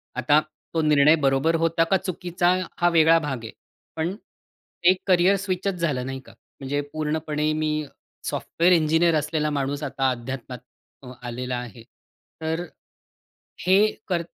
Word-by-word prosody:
आता 145 +4 +3 0.3
तो 165 - +1
निर्णय 150 0 +5
बरोबर 140 +2 +2
होता 165 0 +2
का, 190 +3 +2
चुकीचा 180 -1 0 0.2
हा 175 - +3
वेगळा 165 -1 +5
भाग 135 -6 -4
आहे. 110 - -7 0.4
पण 165 +4 -2 0.8
एक 185 - 0
करियर 185 +1 +4
स्विचच 195 0 -2
झालं 150 -8 -1
नाही 135 0 -5
का? - - -15 0.3
म्हणजे 140 +1 -2
पूर्णपणे 155 0 -1
मी 155 0 -1 0.4
सॉफ्टवेअर 175 +2 +1
इंजिनिअर 160 0 +3
असलेला 150 0 0
माणूस 140 0 -2
आता 135 -1 0
अध्यात्मात 125 0 -6 0.4
अं, 125 - -9 0.2
आलेला 125 +1 -3
आहे. 120 -2 -8 0.6
तर 160 +1 -2 1.0
हे 200 +4 +5 0.2
कर 175 -3 0
155 Hz, 140 wpm, -24 LUFS, 135-170 Hz, 1.0 s, निर्णय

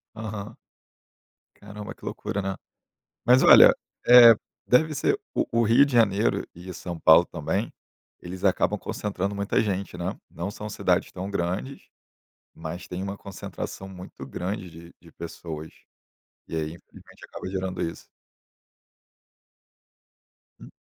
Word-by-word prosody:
Aham. 110 -2 -6 1.0
Caramba, 105 0 -9
que - - -26
loucura, 100 - -3
né. 95 0 -3 0.7
Mas 125 +2 +6
olha, - - +9 0.3
eh, 120 -1 +10 0.3
deve 155 +5 +3
ser 140 - +1 0.2
o - - +1
o 115 0 +2
Rio 115 +5 +6
de 140 - -6
Janeiro 110 -2 +2
e 90 +2 -9
São 85 -2 -6
Paulo 80 +2 +7
também, 85 +7 -3 0.5
eles 90 +1 -8
acabam - - +2
concentrando 100 -1 -3
muita 100 0 0
gente, 100 -2 -3
né. - - -4
Não 85 +4 -5
são 105 +1 -7
cidades - - 0
tão 95 +2 -5
grandes, 100 +9 -3 0.7
mas 85 +3 -7
têm 90 +1 -5
uma 100 +1 -4
concentração 95 0 -7
muito 90 -1 -10
grande 95 0 -4
de 85 +1 -13
de 85 - -18
pessoas, 80 -2 -7 0.8
e - - -5
aí 80 -1 -2
infelizmente 85 - -16
acaba - - -8
gerando 95 -1 -3
isso. 85 - -5 2.5
Hum. - - -13
95 Hz, 130 wpm, -25 LUFS, 85-105 Hz, 2.5 s, eh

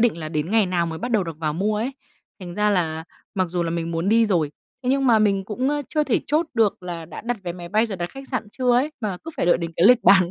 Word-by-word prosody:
định 230 -6 +3
là 155 -1 -5
đến 155 +2 -2
ngày 220 -3 +4
nào 175 -2 0
mới 160 -1 -5
bắt 245 - -4
đầu 210 -5 +2
được 165 -2 -7
vào 155 -2 -1
mua 210 +4 0
ấy. 240 +6 -2 0.5
Thành 175 -1 -7
ra 210 0 +2
là 160 -4 0 0.3
mặc 185 -3 0
dù 175 0 0
là 165 - -2
mình 170 0 -2
muốn 165 +3 -1
đi 225 +1 +4
rồi, 165 -7 +1 0.3
thế 250 - -2
nhưng 275 0 +2
mà 225 -3 +6
mình 200 -2 +2
cũng, 245 +6 -1
ơ, 295 0 0
chưa 305 -1 +1
thể 250 - +1
chốt 310 +3 +1
được 215 -5 +2
là 170 -2 -5
đã 165 - -8
đặt 240 +2 -2
vé 175 -1 -4
máy 175 -1 -9
bay, 215 +4 +2
rồi 200 -4 -5
đặt 175 0 -4
khách 270 0 -10
sạn 250 -5 -3
chưa 250 -1 +2
ấy, 260 +6 +2
mà 205 -5 -2
cứ 325 - -5
phải - - 0
đợi 175 - +4
đến 170 -1 -4
cái 175 - +5
lịch 245 +1 +6
bán 185 -3 +6
195 Hz, 305 wpm, -23 LUFS, 170-235 Hz, 0.5 s, mà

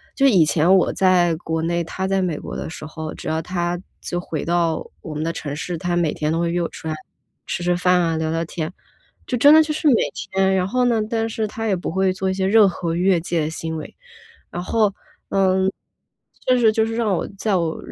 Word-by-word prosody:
就 275 - +3
以 195 -12 +6
前 165 +5 +4
我 180 - +2
在 180 -3 +3
国 160 -1 -3
内， 170 +1 0
他 190 +3 -4
在 195 0 +1
美 175 -5 -1
国 - - -7
的 - - -5
时 155 - -8
候， 155 0 -6
只 - - -9
要 160 0 0
他 175 +1 -2 0.2
就 175 - -3
回 165 -3 -4
到 170 -2 0 0.2
我 160 - -7
们 150 +1 -3
的 165 - -1
城 145 -3 -5
市， 170 +2 -4
他 175 0 -2
每 170 -3 +1
天 155 0 -1
都 165 - 0
会 170 0 0
约 175 +1 0
我 170 - 0
出 160 - -9
来 155 - -2 0.5
吃 175 - -3
吃 175 0 +2
饭 180 0 +3
啊 165 -2 0
聊 160 0 -1
聊 165 +1 -1
天， 160 0 -4 0.6
就 245 - -1
真 290 +5 +7
的 315 - +8
就 305 -1 -1
是 305 0 0
每 265 - +6 0.2
天。 190 0 0
然 185 -1 +1
后 250 +4 +1
呢 235 -3 +2
但 225 -1 -1
是 220 0 -2
他 225 +2 -4
也 200 - +2
不 180 - -4
会 190 +2 +2
做 190 +1 -2
一 - - 0
些 190 0 -1
任 210 0 +6
何 170 -2 -3
越 180 0 +3
界 160 -3 -1
行 160 0 -4
为。 155 - -8 0.6
然 175 - -4
后， 210 +1 +1 0.4
嗯， 190 -1 +2 0.8
就 255 0 +4
是 225 -3 +4
就 220 0 +2
是 225 0 -3
让 220 -4 +1
我 170 - -2
在 210 +1 0
我 165 -2 -1
180 Hz, 260 characters per minute, -21 LUFS, 165-195 Hz, 0.8 s, 的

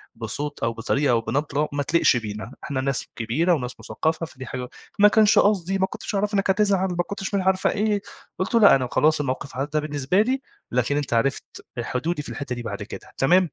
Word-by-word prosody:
بصوت 130 +6 -5
أو 115 0 +1
بطريقة 135 +5 0
أو 115 -1 +3
بنبرة 145 +4 -1
ما 145 - 0
تليقش 155 -4 +3
بينا، 110 +1 -6
إحنا 130 -2 -2
ناس 135 -1 -1
كبيرة 140 +11 +1
وناس 125 -5 -3
مُثقّفة 160 +1 -2
فدي 130 -4 -10
حاجة 125 -1 -5 0.3
ما 210 - +8
كانش 215 0 +5
قصدي، 195 -2 +2
ما 190 - +3
كنتش 205 - -6
أعرف 205 +2 0
إنّك 195 -1 +1
هتزعل، 195 -1 +3
ما 175 0 0
كنتش 200 +1 -5
مش 195 - +2
عارفة 190 0 +2
إيه، 210 -1 0 0.4
قُلت 185 +5 -1
له: 230 - +5
"لأ 205 - +8
أنا 130 -2 0
خلاص 155 +1 +3
الموقف 140 -1 -3
عدّى 145 +3 -1
بالنسبة 150 +5 +1
لي، 260 +4 0 0.3
لكن 125 +4 +1
أنت 145 -5 -2
عرفت 135 +4 +1 0.3
ال 120 - -2
حدودي 155 +5 -2
في - - -8
الحتّة 140 -3 -4
دي 120 - -5
بعد - - -5
كده - - -10
تمام؟" 180 +8 +5
150 Hz, 215 wpm, -24 LUFS, 130-190 Hz, 0.4 s, ما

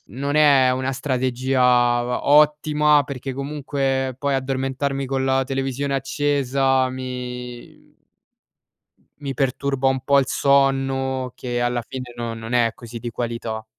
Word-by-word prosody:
non 140 +7 -3
è 140 -4 +5
una 130 +1 -1
strategia 130 0 -1
va 120 0 +2
ottima 150 0 +4
perché 135 0 -6
comunque 135 -1 -2
poi 140 -1 -1
addormentarmi 135 +1 -2
con 135 0 -1
la 135 0 +2
televisione 135 +1 -2
accesa 135 -1 +1
mi 125 -1 -8 1.3
mi 140 -1 -4
perturba 135 0 0
un 130 0 +1
po' 140 0 +4
il 135 - +1
sonno 135 -2 +1
che 120 -1 -3
alla 120 0 0
fine 125 -2 -7
non 115 -1 -5
non 115 +2 -6
è 120 -2 +3
così 115 0 -9
di 120 +1 -5
qualità. 115 -1 -4
130 Hz, 130 wpm, -22 LUFS, 125-140 Hz, 1.3 s, è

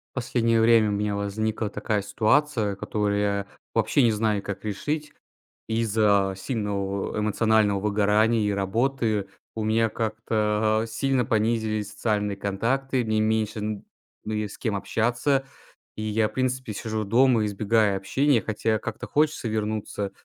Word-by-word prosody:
Последнее 115 -2 +1
время 110 -1 +5
у - - -1
меня 105 0 -1
возникла 105 +2 -2
такая 105 0 -1
ситуация, 110 0 +1
которую 100 +1 -1
я 100 -1 -1 0.3
вообще 145 - +3
не 115 - +4
знаю, 105 -1 0
как 100 +1 -6
решить. 145 +9 -3 0.5
Из-за 105 -3 +2
сильного, 100 -3 -2
эмоционального 105 -1 +2
выгорания 105 +2 +2
и 105 -1 +1
работы 110 +1 0 0.3
у 110 - -2
меня 110 +1 +2
как-то, 110 -1 0
а, - - -5
сильно 125 +2 0
понизились 110 -2 0
социальные 105 -2 -1
контакты. 125 +6 -1
Мне 110 -1 +1
меньше 110 0 0
нь 105 -1 -4 0.4
ну 110 - -3
есть 105 -1 -3
с - - -17
кем 110 -4 -1
общаться, 120 +7 0 0.5
и - - -6
я 110 0 +1
в - - -18
принципе 130 -3 -1
сижу 110 +1 -3
дома, 120 +1 +4
избегая 105 0 +1
общения. 130 +6 +2
Хотя 110 +2 -1
как-то - - -6
хочется 150 -4 +1
вернуться 105 -2 -2
110 Hz, 140 wpm, -25 LUFS, 105-115 Hz, 0.5 s, время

